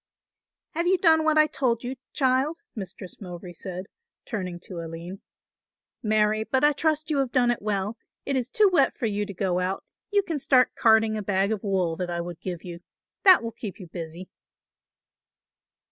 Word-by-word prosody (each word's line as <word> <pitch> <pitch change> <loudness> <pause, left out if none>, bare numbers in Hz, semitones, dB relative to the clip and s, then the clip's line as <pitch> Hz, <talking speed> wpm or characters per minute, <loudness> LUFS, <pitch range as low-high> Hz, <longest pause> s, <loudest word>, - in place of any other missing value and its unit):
"Have 340 +2 -1
you 375 +1 +4
done 320 -3 +4
what 315 0 +3
I 305 - +7
told 255 -6 0
you, 250 +2 -4 0.2
child?" 265 +4 +1 0.2
Mistress 190 -2 -8
Mowbray 175 -1 -8
said, 185 +1 -6 0.4
turning 185 -6 -4
to 175 -1 -7
Aline. 170 +4 -7 0.8
"Marry, 215 -1 +2
but 260 +4 0
I 295 - +6
trust 310 +1 0
you 290 - +2
have 265 -3 0
done 245 -1 +3
it 240 - -2
well. 205 +1 -2 0.3
It 275 - -1
is 250 -1 -1
too 425 +9 +4
wet 280 -6 +3
for - - -2
you 205 -1 -1
to 200 - -6
go 180 -1 0
out; 185 +1 -2 0.3
you 410 -1 +3
can 325 -5 -3
start 260 -2 +4
carding 220 -1 +4
a - - -2
bag 195 0 +1
of 215 -3 -2
wool 185 -5 0
that 180 -1 -3
I 170 0 -2
will 175 +1 -4
give 175 0 -6
you. 175 -2 -7 0.5
That 370 -9 +9
will 230 - -3
keep 215 -3 -7
you 185 - -8
busy." 170 +1 -7
215 Hz, 190 wpm, -26 LUFS, 185-270 Hz, 0.8 s, That